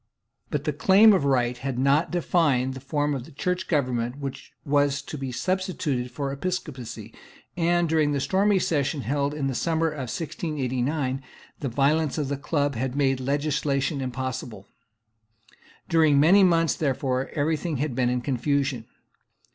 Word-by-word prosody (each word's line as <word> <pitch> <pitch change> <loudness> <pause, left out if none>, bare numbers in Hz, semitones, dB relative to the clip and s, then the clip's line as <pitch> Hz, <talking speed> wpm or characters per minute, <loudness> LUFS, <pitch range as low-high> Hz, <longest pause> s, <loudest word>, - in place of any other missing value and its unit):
But 145 -1 -2
the 150 - -1
Claim 195 +8 +6
of 185 -8 +1
Right 125 -3 +2
had 130 0 -4
not 140 +5 +2
defined 150 -7 +1
the 130 - -7
form 145 +2 -1
of 135 0 -7
Church 180 +3 -2
government 125 -5 0
which 140 -2 -7
was 145 -1 +2
to - - -7
be 135 -3 -4
substituted 160 -6 -2
for 135 +2 -4
episcopacy; 135 - -5 0.4
and, 175 0 +2
during 155 -2 +2
the 140 - 0
stormy 195 +7 +2
Session 145 -5 0
held 140 +3 -1
in 145 -2 -2
the 135 - -1
summer 165 +4 0
of 135 -5 -5
1689, 135 -3 -2 0.4
the 140 - -2
violence 145 +5 +1
of 145 -3 -1
the 140 - -2
Club 145 0 0
had 130 +2 -3
made 135 -2 +1
legislation 140 +1 -1
impossible. 130 -5 -5 1.2
During 160 -4 +4
many 185 +7 +6
months 165 -3 +3
therefore 130 -3 -1
every 155 +1 +1
thing 155 -1 -3
had 145 0 -2
been 125 0 +1
in 125 0 0
confusion. 135 -1 -1
140 Hz, 155 wpm, -25 LUFS, 130-160 Hz, 1.2 s, Claim